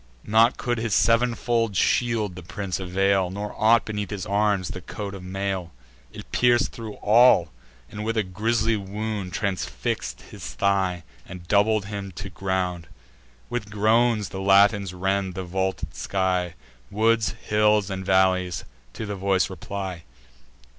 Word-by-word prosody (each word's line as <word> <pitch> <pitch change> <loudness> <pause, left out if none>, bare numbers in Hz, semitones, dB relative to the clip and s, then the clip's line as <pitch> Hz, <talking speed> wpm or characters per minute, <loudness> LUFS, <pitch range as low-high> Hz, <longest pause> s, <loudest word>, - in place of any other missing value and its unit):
Naught 115 +3 +4
could 120 -1 -1
his 115 -5 0
sev'nfold 115 +1 +2
shield 115 -2 +1
the 90 - -8
prince 95 +2 -4
avail, 95 0 +1
Nor 100 +2 -5
aught, 115 +2 +4
beneath 105 -2 -4
his 100 -1 -4
arms, 100 -2 +1
the 95 - -6
coat 100 +1 -6
of 95 - -8
mail: 95 -1 -3 0.4
It - - -11
pierc'd 120 -1 +3
thro' 110 -2 -8
all, 120 +4 +5 0.4
and 105 +8 -7
with 115 +1 -2
a 110 - +3
grisly 110 +4 0
wound 105 -1 -4
Transfix'd 90 - -3
his - - -8
thigh, 95 -3 +1 0.2
and 90 -2 -10
doubled 105 +1 +3
him 100 -1 -6
to 95 +3 -7
ground. 90 -2 -2 0.6
With 120 -4 -4
groans 110 +1 +2
the 95 - -6
Latins 100 0 +4
rend 95 0 -1
the 95 - -4
vaulted 95 +1 -3
sky: 90 -2 -1 0.3
Woods, 110 0 +2
hills, 105 -1 +2
and 95 0 -4
valleys, 95 -1 +2 0.3
to 110 - -5
the 105 -1 -4
voice 95 -1 +1
reply. 95 -2 -5
100 Hz, 145 wpm, -24 LUFS, 95-110 Hz, 0.6 s, all